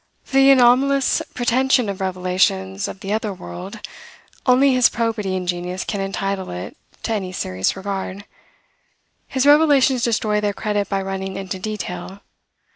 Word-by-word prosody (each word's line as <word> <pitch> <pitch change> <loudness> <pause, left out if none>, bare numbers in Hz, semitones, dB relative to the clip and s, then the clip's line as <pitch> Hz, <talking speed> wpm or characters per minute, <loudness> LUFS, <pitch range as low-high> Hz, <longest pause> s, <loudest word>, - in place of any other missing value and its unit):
For 270 - -2
the 270 0 +7
anomalous 270 +1 +4
pretension 250 0 +2
of 195 -1 -4
Revelations 190 +1 0
of 195 - -8
the 195 +1 -3
other 215 -1 -1
world, 90 - -8 0.7
only 260 +2 +5
his 250 -2 +5
probity 225 -5 -2
and 180 -1 -3
genius 180 +1 -3
can 200 - -3
entitle 195 0 -3
it 90 +1 -6 0.3
to 225 - -1
any 190 -4 -3
serious 95 - -1
regard. 195 0 -5 1.0
His 265 0 0
revelations 285 -4 +5
destroy 215 -2 +1
their 205 -1 0
credit 205 -1 -2
by 195 -1 -1
running 190 0 -4
into 190 -1 -5
detail. 195 -2 -6
200 Hz, 145 wpm, -21 LUFS, 190-245 Hz, 1.0 s, the